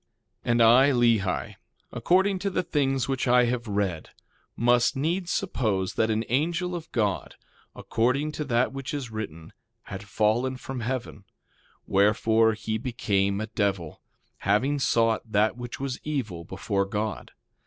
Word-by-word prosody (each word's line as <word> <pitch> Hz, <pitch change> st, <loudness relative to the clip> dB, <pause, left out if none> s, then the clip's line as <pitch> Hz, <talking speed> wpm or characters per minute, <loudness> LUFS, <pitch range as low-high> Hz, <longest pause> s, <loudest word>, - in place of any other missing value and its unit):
2:17 -, -, +1 dB
And 120 Hz, 0 st, +4 dB
I, 125 Hz, +5 st, +7 dB
Lehi, 110 Hz, -, +1 dB, 0.4 s
according 190 Hz, +2 st, +2 dB
to 200 Hz, +2 st, -1 dB
the 185 Hz, -, -1 dB
things 135 Hz, -6 st, 0 dB
which 135 Hz, -1 st, -1 dB
I 125 Hz, 0 st, +5 dB
have 120 Hz, -1 st, -2 dB
read, 100 Hz, -6 st, -2 dB, 0.5 s
must 120 Hz, +3 st, +3 dB
needs 170 Hz, +6 st, -1 dB
suppose 110 Hz, -, -1 dB
that 110 Hz, -, +1 dB
an 110 Hz, +1 st, 0 dB
angel 170 Hz, +7 st, 0 dB
of 165 Hz, -2 st, -6 dB
God, 105 Hz, -5 st, -1 dB, 0.4 s
according 130 Hz, +6 st, 0 dB
to 150 Hz, 0 st, -4 dB
that 125 Hz, 0 st, +1 dB
which 135 Hz, +1 st, -5 dB
is 130 Hz, -5 st, -5 dB
written, 85 Hz, -7 st, -7 dB, 0.3 s
had 95 Hz, -1 st, -7 dB
fallen 110 Hz, +7 st, 0 dB
from 130 Hz, 0 st, -6 dB
heaven; 120 Hz, -4 st, -4 dB, 0.6 s
wherefore, 110 Hz, +3 st, +3 dB
he 110 Hz, +1 st, -3 dB
became 100 Hz, -5 st, 0 dB
a 110 Hz, -, -2 dB
devil, 100 Hz, -7 st, -2 dB, 0.4 s
having 130 Hz, +9 st, +1 dB
sought 115 Hz, -3 st, +1 dB
that 105 Hz, +2 st, +2 dB
which 120 Hz, -1 st, -7 dB
was 135 Hz, -2 st, -4 dB
evil 110 Hz, -, -3 dB
before 100 Hz, +1 st, -1 dB
God. 105 Hz, +2 st, -4 dB
115 Hz, 145 wpm, -26 LUFS, 105-135 Hz, 0.6 s, I